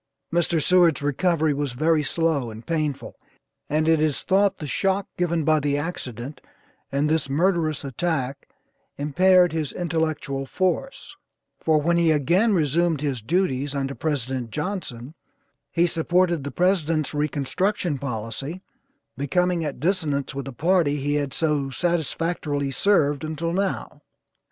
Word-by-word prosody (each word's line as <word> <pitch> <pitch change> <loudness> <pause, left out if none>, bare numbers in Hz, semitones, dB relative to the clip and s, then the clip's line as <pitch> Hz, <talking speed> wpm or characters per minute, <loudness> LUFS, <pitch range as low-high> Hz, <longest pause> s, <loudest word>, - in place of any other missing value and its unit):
Mr. 170 -1 +2
Seward's 170 -3 +4
recovery 160 +1 +1
was 140 -2 -2
very 155 +4 +2
slow 150 -4 0
and 110 +1 -10
painful, 155 -4 -3 0.5
and 155 +2 +1
it 160 -1 +4
is 155 -3 0
thought 195 +1 +2
the 155 - -6
shock 195 +6 0
given 170 -2 0
by 155 +1 +3
the 145 0 0
accident, 135 -4 -5 0.5
and 140 +2 +1
this 155 -3 0
murderous 160 0 +1
attack 140 -1 -2 0.5
impaired 180 +4 +4
his 155 -3 -2
intellectual 155 -5 -2
force, 185 - -2 0.4
for 155 -1 +3
when 170 +3 +2
he 170 -1 +3
again 170 - +3
resumed 165 -2 +2
his 140 -5 -2
duties 145 - 0
under 135 0 -2
President 130 -5 -2
Johnson, 150 - -5 0.6
he 170 0 +3
supported 175 -1 +1
the 140 - -4
President's 165 -5 +1
reconstruction 150 +3 -1
policy, 135 - -5 0.5
becoming 175 +5 0
at 145 -4 -4
dissonance 155 -5 0
with 140 0 -5
the 135 - -6
party 165 +1 +2
he 145 +1 -1
had 145 -2 -1
so 150 -3 0
satisfactorily 160 -2 -1
served, 145 -2 +2
until 160 +2 -3
now. 195 +1 -2
155 Hz, 135 wpm, -24 LUFS, 140-175 Hz, 0.6 s, Seward's